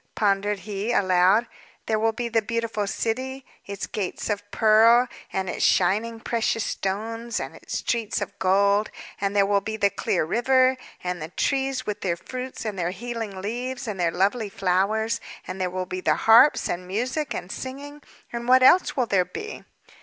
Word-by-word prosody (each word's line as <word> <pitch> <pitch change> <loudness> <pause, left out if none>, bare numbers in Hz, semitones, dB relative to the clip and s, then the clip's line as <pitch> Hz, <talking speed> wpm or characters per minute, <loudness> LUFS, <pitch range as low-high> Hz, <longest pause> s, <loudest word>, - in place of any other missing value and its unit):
pondered 200 -1 +1
he, 205 +3 -3
aloud. 190 +2 +4 0.4
"There 220 -1 0
will 225 +1 +2
be 235 +2 -3
the 230 -1 +1
beautiful 225 -2 -2
city, 260 +6 -3 0.2
its 200 -1 -4
gates 205 +1 -3
of 205 - -1
pearl, 225 +4 +5 0.2
and 190 0 -2
its - - -2
shining 215 +5 +2
precious 225 -1 0
stones, 225 +5 -3
and - - -6
its - - -5
streets 230 -3 -1
of 205 - -6
gold; 200 +2 +3 0.3
and 200 0 -1
there 200 -1 +5
will 200 0 +2
be 220 +1 -4
the 200 -2 +2
clear 185 -3 0
river, 255 +7 +3 0.3
and 180 -2 -3
the 155 - -5
trees 270 - -1
with 210 0 -4
their 175 -3 -1
fruits 255 +5 -7
and 205 -3 -3
their 175 0 0
healing 220 -1 -5
leaves, 245 +4 -4
and 205 -3 -4
the 170 -1 +2
lovely 200 +6 0
flowers; 195 +4 0 0.2
and 185 +1 -6
there 180 - 0
will 185 0 -3
be 185 0 -5
the - - +2
harps, 235 +6 +6
and 180 +1 -4
music, 255 +10 -2
and 180 - -6
singing. 285 +3 -7 0.3
And 235 0 -4
what 255 +1 +6
else 355 +3 +5
will 255 - +2
there 195 -5 +2
be?" 425 - -8
215 Hz, 180 wpm, -24 LUFS, 195-240 Hz, 0.4 s, harps